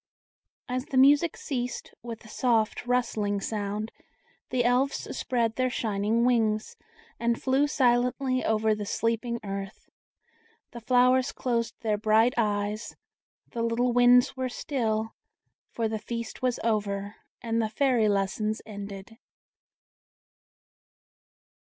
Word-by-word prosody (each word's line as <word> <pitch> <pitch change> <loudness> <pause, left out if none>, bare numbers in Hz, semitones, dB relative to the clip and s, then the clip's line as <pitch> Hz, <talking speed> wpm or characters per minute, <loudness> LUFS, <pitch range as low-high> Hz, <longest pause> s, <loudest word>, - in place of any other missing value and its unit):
As 255 +1 -2
the 265 - -3
music 290 +5 +5
ceased, 245 -3 -4
with 230 -1 -8
a - - -12
soft, 230 0 0
rustling 220 -5 0
sound 210 +1 -3 0.6
the 255 -1 +1
Elves 255 +3 +1
spread 235 -4 0
their 255 0 +2
shining 220 0 0
wings, 220 -3 +1 0.4
and 235 0 0
flew 270 +2 +2
silently 255 -1 +1
over 220 0 +2
the 210 -1 -4
sleeping 230 +2 -1
earth; 195 -1 -7 0.8
the 235 - -9
flowers 250 +2 +3
closed 235 -2 -2
their 215 -2 0
bright 220 +3 +4
eyes, 210 -1 -1 0.6
the 235 - -3
little 235 +2 +1
winds 245 0 +5
were 260 -1 -2
still, 225 -4 -2 0.6
for 230 -1 -2
the 220 0 -3
feast 230 +1 -6
was 250 -1 0
over, 205 -2 -1 0.3
and 230 0 0
the 220 - -1
Fairy 245 -3 +2
lessons 205 +2 0
ended. 200 +1 -9
230 Hz, 120 wpm, -27 LUFS, 215-250 Hz, 0.8 s, music